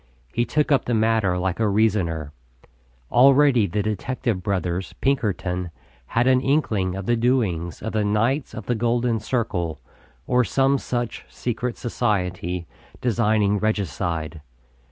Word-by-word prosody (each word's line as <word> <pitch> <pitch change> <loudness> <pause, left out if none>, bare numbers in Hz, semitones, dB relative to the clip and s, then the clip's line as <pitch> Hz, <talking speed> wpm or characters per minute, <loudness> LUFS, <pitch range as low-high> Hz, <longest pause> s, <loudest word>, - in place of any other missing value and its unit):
He 120 - +1
took 150 +2 0
up 140 - +3
the 120 - 0
matter 110 -4 +2
like 90 +1 -1
a 110 -2 +2
reasoner. 95 -8 0 0.8
Already 135 -3 +5
the 100 +4 -1
detective 110 0 -2
brothers, 90 -1 -2
Pinkerton, 95 -9 -1 0.4
had 115 +1 +1
an 130 0 +4
inkling 110 -10 +1
of 95 -1 -5
the 120 - +2
doings 110 -9 0
of 110 - -4
the 110 -1 +1
Knights 115 +8 0
of - - -7
the 125 - 0
Golden 120 0 +1
Circle, 95 - -2 0.5
or 125 +4 +3
some 135 +3 +2
such 120 -2 -3
secret 120 0 -3
society, 90 -7 -2 0.3
designing 105 -3 +2
regicide. 85 -6 -2
110 Hz, 135 wpm, -23 LUFS, 90-120 Hz, 0.8 s, Already